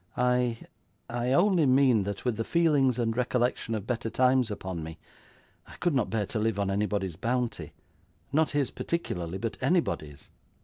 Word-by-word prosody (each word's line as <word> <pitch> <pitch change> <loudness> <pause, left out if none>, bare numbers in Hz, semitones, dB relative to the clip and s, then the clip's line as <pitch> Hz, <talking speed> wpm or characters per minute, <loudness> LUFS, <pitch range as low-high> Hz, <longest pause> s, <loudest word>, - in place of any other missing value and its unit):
I 125 -1 +2 0.5
I 120 +1 -1
only 175 +1 +4
mean 130 -6 +4
that 100 +3 -5
with 125 -3 +1
the 115 - -2
feelings 145 -5 +2
and 115 -2 0
recollection 125 -2 0
of 105 -2 -4
better 115 -1 -2
times 125 +1 +3
upon 95 -4 -5
me, 80 0 -8 0.7
I - - -12
could 175 - 0
not 130 -6 +1
bear 105 -2 -1
to 110 +3 -3
live 110 -1 0
on 100 -1 0
anybody's 100 -4 -1
bounty 120 +2 -2 0.6
not 155 +1 +3
his 145 -3 0
particularly, 90 - -3
but 115 +3 -4
anybody's. 75 - -1
120 Hz, 165 wpm, -28 LUFS, 105-130 Hz, 0.7 s, only